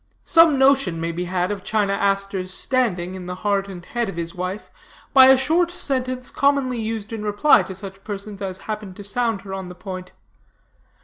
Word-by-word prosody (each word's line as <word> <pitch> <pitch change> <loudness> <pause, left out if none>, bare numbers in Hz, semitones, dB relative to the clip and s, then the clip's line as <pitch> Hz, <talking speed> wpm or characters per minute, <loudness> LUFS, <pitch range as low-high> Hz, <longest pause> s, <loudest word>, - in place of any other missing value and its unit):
Some 330 -4 +6
notion 265 -10 +3
may 165 +1 -2
be 175 +2 -3
had 180 +1 -1
of 200 -2 -5
China 205 -2 0
Aster's 195 -2 -1
standing 185 -6 -1
in 185 -1 -7
the 180 - -4
heart 200 -1 +1
and 180 -3 -9
head 240 -3 -2
of 195 - -6
his 170 0 -4
wife, 185 +2 -5 0.4
by 265 -1 +9
a 265 0 +7
short 325 +6 +2
sentence 255 -7 -3
commonly 275 -3 +1
used 220 -1 -4
in 220 - -4
reply 210 +8 +4
to 190 - -7
such 195 0 -9
persons 205 -1 -7
as 190 -1 -4
happened 210 -3 -5
to 205 - -9
sound 225 0 -1
her 195 -1 -7
on 190 -1 -5
the 180 - -9
point. 185 0 -7
200 Hz, 195 wpm, -22 LUFS, 185-250 Hz, 0.4 s, by